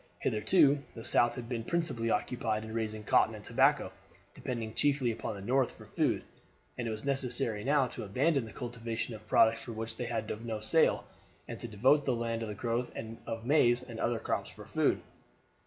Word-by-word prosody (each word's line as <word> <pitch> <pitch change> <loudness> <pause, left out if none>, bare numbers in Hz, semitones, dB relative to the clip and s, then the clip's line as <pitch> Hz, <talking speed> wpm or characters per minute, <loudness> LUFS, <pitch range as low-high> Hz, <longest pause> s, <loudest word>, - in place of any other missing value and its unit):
Hitherto 140 - +3
the 115 - -7
South 120 0 +4
had 120 -3 -6
been 120 -2 -3
principally 130 -7 -1
occupied 110 -3 0
in 110 0 -7
raising 110 -1 -3
cotton - - +3
and - - -10
tobacco, - - +3 0.4
depending 115 -3 -4
chiefly 140 -3 +2
upon 110 - -4
the 100 - -8
North 130 +3 +2
for - - -12
food; - - 0 0.5
and 120 - -3
it - - -1
was 110 +3 -4
necessary 125 -5 -1
now 140 0 +3
to 125 - -6
abandon 130 +6 +1
the 110 - -10
cultivation 115 -1 -4
of 110 0 -11
products 115 0 +4
for 120 - -7
which 110 +1 -5
they 125 - -3
had 110 -1 -3
no 110 -2 -3
sale, 160 +10 +3 0.4
and - - -6
to - - -5
devote 130 +7 +3
the 130 - +2
land 115 -1 -2
to 115 - -4
the 105 - -5
growth 120 +3 -1 0.4
of 115 0 -4
maize 125 -3 +4
and 115 -2 -7
other 120 0 +1
crops - - -2
for - - -12
food. - - +1
115 Hz, 195 wpm, -31 LUFS, 110-130 Hz, 0.5 s, South